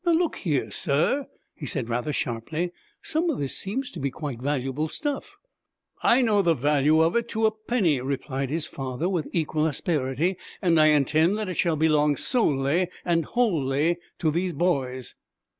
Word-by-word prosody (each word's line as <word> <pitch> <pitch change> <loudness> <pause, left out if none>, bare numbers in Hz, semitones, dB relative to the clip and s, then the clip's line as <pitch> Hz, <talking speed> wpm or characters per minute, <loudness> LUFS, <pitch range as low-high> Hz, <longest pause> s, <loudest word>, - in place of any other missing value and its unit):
'Now, 345 -2 +3
look 335 0 +1
here, 150 -8 -1
sir,' 170 - +1 0.3
he - - -7
said, 135 - -1
rather 120 +5 -1
sharply, 150 +8 -2 0.3
'some 325 +2 0
of 315 - -1
this 140 -2 -2
seems 250 +7 -2
to - - -8
be 140 - -1
quite 135 -3 -6
valuable 140 +2 -1
stuff 285 - -4 0.3
' - - -39
'I 250 +2 +4
know 210 -3 +3
the 170 -3 +3
value 150 +3 +3
of 165 +5 +1
it 235 0 +1
to 220 0 0
a 220 - +4
penny,' 215 - 0
replied 135 0 -3
his 160 +2 -2
father, 135 +4 -4
with 180 -5 -1
equal 155 -2 0
asperity, 150 +3 -1 0.2
'and 170 -4 +3
I 155 - +6
intend 155 +6 +3
that 215 -3 -3
it 180 - -4
shall 170 -3 +2
belong 150 -1 +3
solely 155 - +1 0.2
and 165 -2 +1
wholly 165 - +1 0.2
to 155 - +1
these 175 +3 -1
boys.' 135 -7 -1
160 Hz, 175 wpm, -25 LUFS, 140-190 Hz, 0.3 s, I